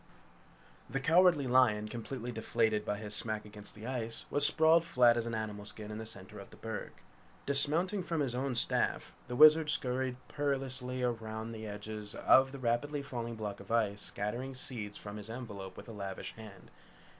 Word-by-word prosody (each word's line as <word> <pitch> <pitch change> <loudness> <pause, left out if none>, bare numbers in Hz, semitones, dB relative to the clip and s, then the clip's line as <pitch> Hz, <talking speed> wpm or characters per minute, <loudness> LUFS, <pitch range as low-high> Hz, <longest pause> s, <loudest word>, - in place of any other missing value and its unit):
The 135 - -2
Cowardly 165 0 +4
Lion, 120 -4 +3
completely 120 +2 -6
deflated 110 -1 0
by 105 -1 -2
his 105 0 -3
smack 110 -1 -2
against 105 -1 -11
the 105 +1 -10
ice, 115 -3 -3
was 145 - +5
sprawled 160 +2 +6
flat 125 -8 +4
as 120 -1 -2
an 115 - -3
animal 105 -2 -4
skin 105 0 -7
in 105 - -6
the 110 - -6
center 100 +1 -8
of 100 - -11
the - - -15
berg. 110 -1 -5 0.6
Dismounting 155 +8 +3
from 165 -2 -2
his 135 -4 -1
own 130 0 -2
staff, 120 - +1
the 125 - -4
Wizard 155 +2 +7
scurried 130 -2 0
perilously 135 -3 -2
round 110 -1 -3
the 110 -1 -7
edges 105 0 -7
of 130 0 +5
the 140 - -7
rapidly 135 +4 -1
falling 120 -4 -5
block 105 -2 -5
of 100 - -13
ice 105 -3 +1
scattering 120 +6 -3
seeds 110 -5 -4
from 105 0 -8
his 105 +1 -9
envelope 105 -6 -7
with - - -10
a - - -8
lavish 100 -2 -6
hand. 110 -3 -12
115 Hz, 180 wpm, -32 LUFS, 105-135 Hz, 0.6 s, Wizard